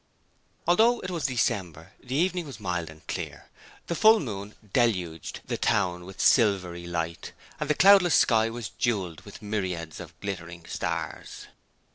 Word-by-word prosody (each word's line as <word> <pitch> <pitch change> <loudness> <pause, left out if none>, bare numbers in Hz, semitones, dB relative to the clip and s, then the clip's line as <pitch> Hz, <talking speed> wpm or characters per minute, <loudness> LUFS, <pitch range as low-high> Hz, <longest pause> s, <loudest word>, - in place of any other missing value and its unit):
Although 225 +8 +4
it 185 - -5
was 165 -5 -1
December 100 - -2
the 130 +1 -4
evening 180 +1 +1
was 130 -6 -9
mild 90 -5 -2
and 80 -1 -15
clear. - - -6 0.4
The - - -2
full 220 +5 +6
moon 105 -6 -6 0.2
deluged 90 - 0
the - - -3
town 90 -1 +1
with 95 +1 -11
silvery 90 -7 +3
light, 85 -1 -4 0.3
and 150 - -3
the 150 - +3
cloudless 195 -3 +6
sky 115 -1 +4
was 115 -2 -5
jewelled 95 -9 -2
with 100 +1 -12
myriads 90 -6 -3
of 85 -2 -11
glittering 85 -4 -6
stars. - - -4
100 Hz, 150 wpm, -27 LUFS, 85-135 Hz, 0.4 s, full